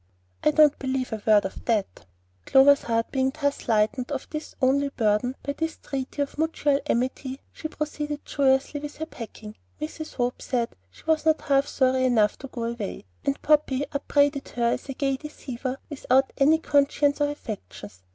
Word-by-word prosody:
"I -, -, +5 dB
don't 300 Hz, -1 st, +5 dB
believe 260 Hz, -2 st, -2 dB
a 220 Hz, -, -4 dB
word 210 Hz, -2 st, +6 dB
of 190 Hz, -, -6 dB
that" 215 Hz, -, -1 dB, 0.4 s
Clover's 280 Hz, +1 st, +6 dB
heart 230 Hz, -1 st, -1 dB
being 265 Hz, -1 st, +1 dB
thus 285 Hz, -1 st, -1 dB
lightened 225 Hz, +4 st, +1 dB
of 270 Hz, -2 st, -3 dB
its 305 Hz, 0 st, -5 dB
only 280 Hz, +1 st, +3 dB
burden 230 Hz, 0 st, +1 dB
by 280 Hz, -, -2 dB
this 325 Hz, +2 st, -3 dB
treaty 275 Hz, +1 st, -3 dB
of 285 Hz, -, -9 dB
mutual 300 Hz, -3 st, +1 dB
amity, 260 Hz, +2 st, -1 dB
she 315 Hz, -, -5 dB
proceeded 300 Hz, -1 st, -4 dB
joyously 270 Hz, +1 st, +2 dB
with 295 Hz, 0 st, -7 dB
her 315 Hz, -, -3 dB
packing. 220 Hz, -6 st, -9 dB, 0.2 s
Mrs. 310 Hz, +1 st, -6 dB
Hope 245 Hz, 0 st, -1 dB
said 240 Hz, -2 st, -1 dB, 0.2 s
she -, -, -19 dB
was 320 Hz, -1 st, +2 dB
not 315 Hz, 0 st, +4 dB
half 275 Hz, 0 st, +2 dB
sorry 260 Hz, -1 st, +2 dB
enough 220 Hz, -5 st, +3 dB
to 275 Hz, -, -7 dB
go 240 Hz, -3 st, -5 dB
away, 230 Hz, -, -4 dB, 0.2 s
and 275 Hz, -, 0 dB
Poppy 290 Hz, -2 st, +3 dB
upbraided 285 Hz, 0 st, +1 dB
her 235 Hz, -1 st, +2 dB
as -, -, -6 dB
a 270 Hz, -, -4 dB
gay 275 Hz, -1 st, 0 dB
deceiver 265 Hz, -3 st, -5 dB
without 270 Hz, -2 st, +1 dB
any 300 Hz, +3 st, +5 dB
conscience 285 Hz, -1 st, +2 dB
or 290 Hz, -, +3 dB
affections. 195 Hz, -, -8 dB
275 Hz, 175 wpm, -26 LUFS, 245-290 Hz, 0.4 s, word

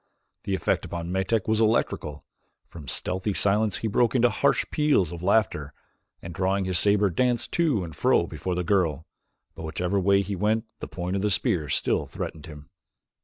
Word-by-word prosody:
The 95 Hz, -, 0 dB
effect -, -, 0 dB
upon 85 Hz, 0 st, -5 dB
Metak 95 Hz, +3 st, 0 dB
was 110 Hz, 0 st, +2 dB
electrical. 90 Hz, -9 st, 0 dB, 0.4 s
From 75 Hz, -4 st, -12 dB
stealthy 95 Hz, -, -1 dB
silence 105 Hz, +2 st, +2 dB
he 115 Hz, -, -3 dB
broke 115 Hz, +3 st, +1 dB
into 120 Hz, -1 st, +4 dB
harsh 140 Hz, -, +2 dB
peals 145 Hz, -, +2 dB
of 85 Hz, -1 st, -7 dB
laughter, 90 Hz, -7 st, 0 dB, 0.5 s
and 85 Hz, -, -7 dB
drawing 95 Hz, +2 st, 0 dB
his 90 Hz, -2 st, +3 dB
saber 100 Hz, -1 st, +3 dB
danced 120 Hz, +6 st, 0 dB
to 150 Hz, -, +1 dB
and 80 Hz, -4 st, -8 dB
fro -, -, +2 dB
before 90 Hz, -1 st, -4 dB
the 90 Hz, -, -1 dB
girl, 80 Hz, -4 st, 0 dB, 0.5 s
but -, -, -10 dB
whichever 90 Hz, +5 st, -1 dB
way 100 Hz, +1 st, +3 dB
he 100 Hz, 0 st, -4 dB
went 110 Hz, +4 st, 0 dB
the -, -, -6 dB
point 90 Hz, +1 st, -4 dB
of 100 Hz, -, -1 dB
the 105 Hz, -, +1 dB
spear 95 Hz, -, 0 dB
still -, -, 0 dB
threatened 80 Hz, 0 st, -7 dB
him. 75 Hz, -2 st, -12 dB
95 Hz, 180 wpm, -25 LUFS, 85-110 Hz, 0.5 s, into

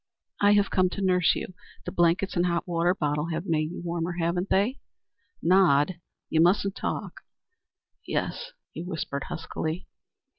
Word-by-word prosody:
"I 205 Hz, 0 st, +6 dB
have 205 Hz, -1 st, +3 dB
come 185 Hz, -1 st, +3 dB
to 200 Hz, -, -4 dB
nurse 180 Hz, -2 st, +3 dB
you. -, -, -5 dB, 0.3 s
The -, -, -4 dB
blankets 175 Hz, +3 st, +2 dB
and 175 Hz, 0 st, +2 dB
hot 170 Hz, 0 st, -1 dB
water 175 Hz, +1 st, +1 dB
bottle 150 Hz, -2 st, -1 dB
have 165 Hz, +1 st, -3 dB
made 155 Hz, -4 st, 0 dB
you 175 Hz, -, -7 dB
warmer, 170 Hz, 0 st, -2 dB
haven't 175 Hz, +2 st, -1 dB
they? 215 Hz, +8 st, +2 dB, 0.6 s
Nod; 175 Hz, -2 st, +4 dB, 0.3 s
you 160 Hz, -, +2 dB
mustn't 195 Hz, +3 st, +3 dB
talk." -, -, -4 dB, 0.9 s
"Yes," -, -, -2 dB, 0.2 s
he -, -, -6 dB
whispered 160 Hz, -5 st, -4 dB
huskily. 165 Hz, +1 st, -4 dB
175 Hz, 150 wpm, -27 LUFS, 165-190 Hz, 0.9 s, I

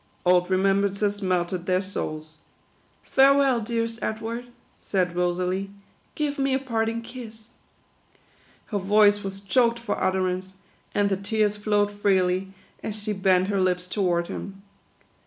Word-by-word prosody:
Old 180 Hz, 0 st, +4 dB
remembrances 200 Hz, +2 st, +1 dB
melted 180 Hz, -1 st, -1 dB
their 185 Hz, 0 st, +3 dB
souls. 155 Hz, -5 st, -5 dB, 0.4 s
" -, -, -38 dB
Farewell, 270 Hz, -2 st, +4 dB
dear 230 Hz, +1 st, -1 dB
est 230 Hz, 0 st, -6 dB
Edward," 225 Hz, +2 st, -4 dB, 0.3 s
said 180 Hz, -3 st, -1 dB
Rosalie. 180 Hz, +2 st, -1 dB, 0.3 s
" -, -, -38 dB
Give 290 Hz, -1 st, -2 dB
me 270 Hz, -1 st, +2 dB
a -, -, +1 dB
parting 230 Hz, -3 st, -2 dB
kiss." 230 Hz, -2 st, -10 dB, 1.2 s
Her 205 Hz, -, -1 dB
voice 205 Hz, +1 st, +4 dB
was 195 Hz, 0 st, -5 dB
choked 235 Hz, +4 st, +2 dB
for 235 Hz, -2 st, -3 dB
utterance, 185 Hz, 0 st, -1 dB, 0.4 s
and 205 Hz, -1 st, +2 dB
the 195 Hz, -, +1 dB
tears 210 Hz, +1 st, 0 dB
flowed 205 Hz, -1 st, +1 dB
freely, 190 Hz, -2 st, +1 dB, 0.3 s
as 215 Hz, -, -4 dB
she 210 Hz, 0 st, -3 dB
bent 190 Hz, -1 st, +2 dB
her 200 Hz, -2 st, +1 dB
lips 180 Hz, -1 st, +1 dB
toward 180 Hz, -3 st, 0 dB
him. 195 Hz, +2 st, -7 dB
200 Hz, 140 wpm, -25 LUFS, 185-225 Hz, 1.2 s, Old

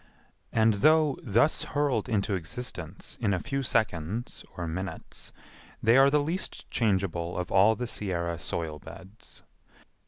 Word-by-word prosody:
And 110 Hz, -1 st, +4 dB
though 155 Hz, -1 st, +4 dB
thus 120 Hz, +7 st, +2 dB
hurled 145 Hz, -7 st, 0 dB
into 105 Hz, -1 st, 0 dB
existence 90 Hz, -1 st, -6 dB
in 100 Hz, -4 st, +2 dB
a -, -, -2 dB
few 135 Hz, +5 st, -2 dB
seconds 105 Hz, -, -1 dB
or 85 Hz, -, -3 dB
minutes, 95 Hz, +4 st, -6 dB, 0.5 s
they 115 Hz, +1 st, +5 dB
are 135 Hz, +1 st, +7 dB
the 150 Hz, -, +3 dB
least 170 Hz, +5 st, -3 dB
changeable 95 Hz, -6 st, 0 dB
of 90 Hz, 0 st, -3 dB
all 100 Hz, +4 st, +5 dB
the 125 Hz, -, -3 dB
Sierra 85 Hz, -7 st, -2 dB
soil 80 Hz, -2 st, -3 dB
beds. 95 Hz, +7 st, -13 dB
105 Hz, 135 wpm, -28 LUFS, 90-125 Hz, 0.5 s, are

